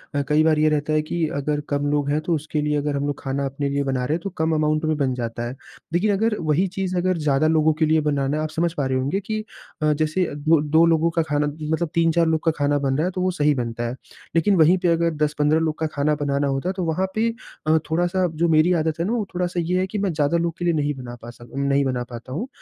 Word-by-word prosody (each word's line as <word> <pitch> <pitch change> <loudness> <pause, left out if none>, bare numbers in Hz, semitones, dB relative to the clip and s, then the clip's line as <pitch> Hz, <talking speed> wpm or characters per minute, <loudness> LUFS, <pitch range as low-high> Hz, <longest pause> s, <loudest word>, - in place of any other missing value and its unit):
अ, 145 - +2
कई 155 +1 +4
बार 155 -1 +3
ये 155 0 +4
रहता 150 0 0
है 155 - +3
कि 160 +1 -2
अगर 150 +1 -1
कम 145 0 0
लोग 145 -1 0
हैं 150 +2 +1
तो 170 +1 -1
उसके 155 0 -3
लिए 150 0 0
अगर 145 0 -1
हम 140 +1 -1
लोग 145 - -4
खाना 135 +1 -2
अपने 140 +1 -2
लिए 140 0 0
बना 130 -2 -1
रहे 155 - 0
हैं 170 - -4
तो 195 - -3
कम 160 0 +1
अमाउंट 155 0 +1
में 155 0 +1
बन 135 -3 0
जाता 120 -1 -4
है। 125 - -6 0.4
देखिए 195 +5 +2
अगर 215 +2 +1
वही 165 +4 +1
चीज़ 185 -1 -1
अगर 185 0 +1
ज़्यादा 150 0 +2
लोगों 155 -1 +3
के 155 +1 +1
लिए 155 0 +3
बनाना 145 -1 0
है, 155 - -1
आप 155 - -2
समझ 170 +2 0
पा 145 -5 -2
रहे 130 0 0
होंगे 140 +9 -1
कि 215 +2 -4 0.4
अ, 155 0 +3
जैसे 155 +4 0
अ, - - -6
दो 150 +1 +2
2 160 +3 +4
लोगों 165 0 +3
का 165 - +1
खाना 150 -1 0
मतलब 155 +2 -2
3-4 165 0 +3
लोग 160 -1 0
का 165 - +4
खाना 145 0 +2
बन 135 -1 0
रहा 155 - +1
है 185 - -1
तो 185 0 -3
वो 185 0 +1
सही 150 -3 +2
बनता 120 -1 -3
है। 125 - -4 0.4
लेकिन 190 +4 +3
वही 170 +3 +5
पे 175 - 0
अगर 170 -1 +2
10-15 150 +1 +2
लोग 160 -1 -1
का 160 - 0
खाना 150 +1 +1
बनाना 140 -1 0
होता 135 +6 -1
है - - -1
तो 185 - -1
वहाँ 165 +4 0
पे 225 +1 +2 0.4
अ, 160 +1 +5
थोड़ा-सा 175 +3 +1
जो 170 +2 +1
मेरी 160 +3 +4
आदत 160 0 -2
है 170 - 0
ना 225 - -1
वो 220 -4 -1
थोड़ा-सा 180 0 -1
ये 180 +2 0
है 190 - 0
कि 210 - -5
मैं 195 -2 0
ज़्यादा 150 +2 +1
लोग 170 -1 -2
के 175 - -3
लिए 170 - +3
नहीं 145 -1 0
बना 125 -2 -8
पासा 120 0 -11
नहीं 140 0 +1
बना 125 -2 -1
पाता 120 +1 -9
हूँ। 220 - -3
155 Hz, 280 wpm, -22 LUFS, 145-170 Hz, 0.4 s, वही